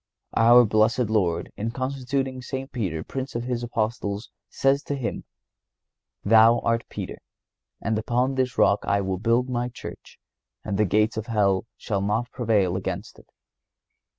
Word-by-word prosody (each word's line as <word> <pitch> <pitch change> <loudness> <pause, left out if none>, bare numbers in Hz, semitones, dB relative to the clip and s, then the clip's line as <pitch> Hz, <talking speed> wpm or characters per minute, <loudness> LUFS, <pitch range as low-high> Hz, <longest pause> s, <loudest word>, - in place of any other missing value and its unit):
Our 120 +2 +7
blessed 110 +2 +2
Lord, 90 -6 0
in 110 +2 -3
constituting 130 +1 -2
St. 135 +2 -5
Peter 90 - -3
Prince 135 -1 -5
of 120 - -2
His 120 -1 -2
Apostles, 110 -2 -3 0.2
says 135 +1 +2
to 145 - -2
him: 130 -4 -4 1.0
"Thou 115 +2 +6
art 115 0 0
Peter, - - -6 0.6
and 110 -1 -1
upon 125 +4 0
this 130 -1 -1
rock 100 - +4
I 100 - +1
will 95 -1 -2
build 115 +4 +2
My 120 -1 -2
Church, 125 - -10 0.5
and 100 -2 -3
the 105 - +4
gates 105 +4 +1
of 110 - -4
hell 100 -3 +1
shall 100 -3 -2
not 105 +5 -1
prevail 105 -7 +1
against 95 +2 -5
it." - - -20
115 Hz, 150 wpm, -25 LUFS, 105-125 Hz, 1.0 s, Our